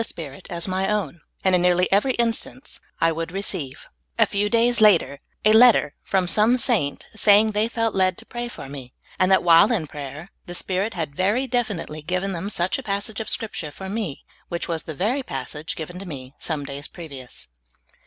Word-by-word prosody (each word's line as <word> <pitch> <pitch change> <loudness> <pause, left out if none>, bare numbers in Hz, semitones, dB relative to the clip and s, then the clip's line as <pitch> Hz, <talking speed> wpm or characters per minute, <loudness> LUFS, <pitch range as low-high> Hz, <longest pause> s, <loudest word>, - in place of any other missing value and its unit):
Spirit 150 -10 -9
as 170 +1 -4
my 190 +1 0
own, 205 -5 -2 0.2
and 190 - +3
in 180 - +4
nearly 180 0 +3
every 210 +7 +3
such - - -8
instance 235 +2 -2 0.2
I 165 - +3
would 165 +1 -4
receive, 185 -8 -3 0.3
a - - +6
few 205 +1 -1
days 235 +1 +3
after, 175 -9 +5 0.3
a 215 - +6
letter 240 +1 +6
from 190 -2 +1
some 215 +6 +4
saint 220 - 0
saying 215 0 +5
they 210 +1 +1
felt 230 -1 -1
led 185 -1 +2
to - - -13
pray 240 0 -5
for 240 - -9
me, 135 -2 -9 0.3
and 185 +1 +3
that 190 - +5
w^hile 165 -1 +6
in 200 -9 0
prayer 145 +4 -8 0.2
the 175 - -5
Spirit 195 +5 -2
had 155 -5 -3
very 205 - +1
definitely 215 -11 -2
given 185 +5 -1
them 185 +2 -4
such 185 +3 -1
a - - -7
passage 205 +1 -3
of 220 - -4
Scripture 205 -8 -3
for 190 +6 -8
me, 200 -8 -4 0.2
which 170 - -3
was 165 -2 -2
the 160 - -7
very 230 - 0
passage 150 - -5
given 175 +3 -7
to 195 - -8
me 135 -4 -8
some 150 -4 -3
days 140 +1 -6
previous. 140 -7 -10
185 Hz, 200 wpm, -23 LUFS, 160-215 Hz, 0.3 s, a